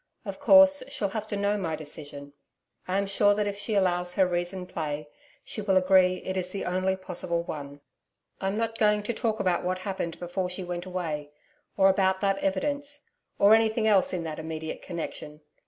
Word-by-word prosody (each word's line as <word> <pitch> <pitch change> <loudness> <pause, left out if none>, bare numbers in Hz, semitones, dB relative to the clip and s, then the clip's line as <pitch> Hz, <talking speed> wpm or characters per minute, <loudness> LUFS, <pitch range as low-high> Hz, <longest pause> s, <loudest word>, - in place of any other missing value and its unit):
Of - - -6
course, 285 0 +7
she'll 225 -8 -1
have 215 +1 -4
to 205 - -3
know 200 +1 +1
my 165 -4 -2
decision. 145 -2 -8 0.5
I 185 +1 0
am 200 - +1
sure 205 +1 +3
that 210 0 0
if 205 -1 -2
she 205 +1 -2
allows 180 -2 +1
her 190 - +4
reason 180 +1 -2
play, 150 -4 -4 0.4
she 215 - -4
will 195 -2 +2
agree 185 -1 +4
it 190 - -3
is 185 -1 -2
the 195 - -4
only 185 +1 0
possible 180 -2 -3
one. 145 -3 -7 0.6
I'm 195 +2 -1
not 225 0 -2
going 210 -1 +3
to 235 - -2
talk 225 -1 -1
about 180 -2 +1
what 185 +1 -1
happened 185 -3 -4
before 180 +1 -3
she 180 +1 -4
went 175 0 -5
away, 160 -5 -4 0.5
or 195 -1 +6
about 190 0 +3
that 195 -1 +1
evidence 285 +10 -2 0.3
or 205 +2 +6
anything 220 0 +3
else 205 -3 +4
in 180 -2 -2
that 160 -1 -5
immediate 160 0 -5
connection. 155 -3 -6
190 Hz, 190 wpm, -27 LUFS, 175-205 Hz, 0.6 s, course